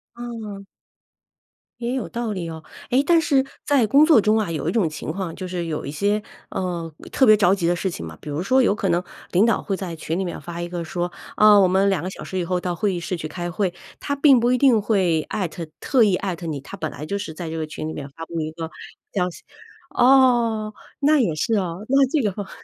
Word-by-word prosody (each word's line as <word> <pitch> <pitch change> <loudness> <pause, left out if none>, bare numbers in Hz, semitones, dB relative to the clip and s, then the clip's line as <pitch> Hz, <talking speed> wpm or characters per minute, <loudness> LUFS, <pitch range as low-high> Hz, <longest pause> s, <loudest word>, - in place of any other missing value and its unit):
嗯。 220 -5 -7 1.1
也 240 +1 -2
有 265 - -2
道 235 -2 -3
理 170 -3 -4
哦， 160 -1 -7 0.3
哎， 255 +3 +4
但 340 -1 +6
是 275 -4 +2 0.2
在 270 -6 +3
工 285 +5 +6
作 310 -8 +6
中 215 +2 +3
啊， 205 -6 -1
有 155 - -3
一 - - +2
种 200 -9 +1
情 155 0 -5
况， 185 -3 -4
就 185 - -6
是 175 -2 -3
有 155 -4 -4
一 140 - -4
些， 205 +6 0 0.3
呃， 170 -4 -3 0.2
特 265 - +4
别 215 -2 +7
着 200 -1 +4
急 170 -3 -1
的 175 - +3
事 190 +2 -1
情 85 - -6
嘛， 80 0 -9
比 150 - -9
如 150 +5 -2
说 260 +6 +4
有 210 -4 +3
可 195 -3 -1
能， 170 +1 +2 0.3
领 190 +5 +4
导 230 - +2
会 195 -3 -2
在 175 -4 -5
群 165 +3 -3
里 190 - -1
面 175 - -5
发 170 0 -6
一 175 - -3
个 175 -1 -4
说， 175 +2 -3 0.3
啊， 210 -1 +7
我 190 -2 +5
们 195 +2 +3
2 180 -4 0
个 185 - -3
小 - - -10
时 190 - -5
以 180 - 0
后 180 +1 -1
到 175 -1 -3
会 195 +2 0
议 175 - -2
室 180 +2 -3
去 155 -2 -6
开 175 -1 -4
会， 180 0 -1 0.3
他 285 - -2
并 280 -3 +5
不 240 +1 +3
一 255 - +3
定 245 -5 +4
会 185 -7 +2
艾 185 -4 -1
特 165 0 -7
特 255 -5 +3
意 200 -4 +3
艾 190 -3 -3
特 170 - -9
你， 150 -3 -3
他 170 +8 -10
本 160 -5 -4
来 150 - -7
就 200 +5 -2
是 185 -6 -5
在 165 0 -6
这 165 - -4
个 160 - -2
群 155 0 -6
里 160 - -4
面 140 -1 -7
发 165 +4 -9
布 165 -1 -4
一 155 0 -3
个 165 0 -6 0.4
消 180 -3 +1
息， - - -12 0.5
哦， 240 -4 +4 0.3
那 300 +1 +4
也 175 -9 +1
是 225 +9 -1
啊， 180 -5 0
那 275 +1 +5
这 305 -2 +1
个 205 -4 0
话 - - -15
190 Hz, 275 characters per minute, -22 LUFS, 170-225 Hz, 1.1 s, 别